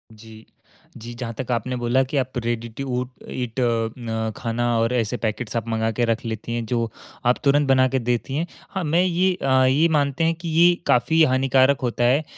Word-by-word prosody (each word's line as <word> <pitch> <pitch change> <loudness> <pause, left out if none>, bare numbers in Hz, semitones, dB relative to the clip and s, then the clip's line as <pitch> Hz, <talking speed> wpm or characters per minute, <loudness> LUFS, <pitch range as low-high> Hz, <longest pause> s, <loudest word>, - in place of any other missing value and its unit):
जी। 110 0 -14 0.5
जी, 120 +2 -9
जहाँ 120 -1 -5
तक 130 -1 -4
आपने 120 +2 -1
बोला 120 +2 +1
कि 135 +2 -3
आप 130 -1 -2
रेडी 120 0 -2
टू 135 - -3 0.2
उट 125 - -6 0.2
ईट 125 -1 -4
अ, 115 -2 +1
न 110 -2 -3
खाना 120 +1 -2
और 115 +2 +1
ऐसे 120 0 0
पैकेट्स 110 +1 -3
आप 115 0 -3
मँगा 110 0 0
के 120 +2 0
रख 115 0 -1
लेती 115 +1 -4
हैं 120 -1 -2
जो 115 0 -1 0.4
आप 125 +1 +3
तुरंत 145 0 +3
बना 130 -1 +4
के 130 +1 0
देती 125 +3 -2
हैं। 160 - 0 0.2
हाँ, 190 - -3
मैं 165 +3 +2
ये 185 +1 +2
अ, - - -1 0.2
यही 145 +6 +4
मानते 145 0 +1
हैं 165 - +3
कि 170 - -4
ये 170 +2 +5
काफ़ी 160 +7 +4
हानिकारक 130 0 +3
होता 120 -1 -1
है 130 +6 +3
125 Hz, 215 wpm, -22 LUFS, 115-140 Hz, 0.5 s, ये